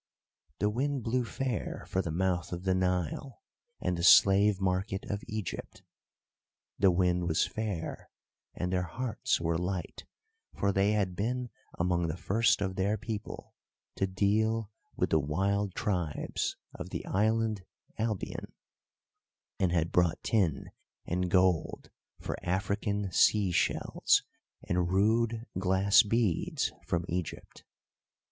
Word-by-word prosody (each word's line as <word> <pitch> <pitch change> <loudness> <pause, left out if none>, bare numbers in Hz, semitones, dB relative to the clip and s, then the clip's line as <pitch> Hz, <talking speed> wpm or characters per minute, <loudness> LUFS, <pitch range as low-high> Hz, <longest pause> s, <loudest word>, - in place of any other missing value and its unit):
The 105 +3 +1
wind 135 +2 -1
blew 125 +2 0
fair 125 -1 -3
for 95 - 0
the 85 - -4
mouth 90 +1 -1
of 90 0 -5
the 95 -1 +2
Nile 90 - -1 0.4
and 90 -1 -1
the 85 - -4
slave 100 +2 +6
market 95 +1 -1
of 100 0 -3
Egypt. 110 -2 -5 1.0
The 95 - +6
wind 90 -1 +2
was 80 -1 +2
fair, 105 -7 -4 0.5
and 90 +1 -2
their 90 - +2
hearts 120 +6 -1
were 85 0 0
light, 90 -1 -4 0.5
for 100 - +1
they 100 +2 +2
had 95 -4 0
been 120 +5 -2 0.3
among 85 -1 +1
the 80 +2 -3
first 100 +6 +2
of 95 -1 -2
their 100 +3 +1
people 110 -1 -6 0.4
to 95 - +1
deal 105 +3 +1 0.2
with - - 0
the 80 - +4
wild 95 +7 0
tribes 90 -7 -2 0.2
of - - -7
the - - -5
island 110 0 +1 0.4
Albion, 110 -3 -3 1.1
and 90 -2 +2
had 85 -1 +1
bought 90 -2 +2
tin 95 -9 0 0.3
and 90 +1 -1
gold 90 -2 +1 0.3
for - - -4
African 100 +2 -1
sea 100 -2 +4
shells - - +2 0.4
and 90 0 +1
rude 110 +4 +2
glass 95 +2 +5
beads 110 -4 0 0.2
from 85 -1 0
Egypt. 90 -1 -5
95 Hz, 130 wpm, -30 LUFS, 90-105 Hz, 1.1 s, slave